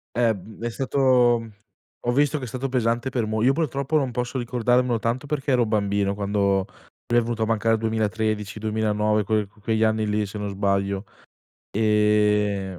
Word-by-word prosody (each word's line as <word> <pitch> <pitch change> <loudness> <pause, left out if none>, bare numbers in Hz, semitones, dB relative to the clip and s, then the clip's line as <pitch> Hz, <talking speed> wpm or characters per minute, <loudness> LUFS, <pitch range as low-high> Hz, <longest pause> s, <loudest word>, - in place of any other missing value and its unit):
Eh, 120 -1 +3
uhm, 105 +2 -11
è 120 - -1
stato 125 -3 +2 0.5
ho 120 - +1
visto 145 +3 +2
che 130 - -6
è - - -5
stato 130 +4 -4
pesante 120 0 0
per 120 -4 -1
mol 110 +1 -1
io 135 - +5
purtroppo 140 -1 -1
non 135 -3 -1
posso 125 +2 -3
ricordarmelo 120 0 +1
tanto 120 +5 -2
perché 140 -1 -2
ero 120 -2 +3
bambino 100 -2 0
quando 100 -1 0 0.4
lui 120 0 +3
è - - +4
venuto 115 -1 -3
a - - +2
mancare 115 0 +2
il 110 - -1
2013, 110 -1 -1
2009, 105 -1 0
quel 105 0 0
que 105 +2 -24
quegli 110 +1 0
anni 110 0 +1
lì 105 0 0
se 105 +2 -7
non 105 0 -3
sbaglio. 100 0 -1 0.7
Ehm, 105 -3 +2
110 Hz, 185 wpm, -24 LUFS, 105-120 Hz, 0.7 s, io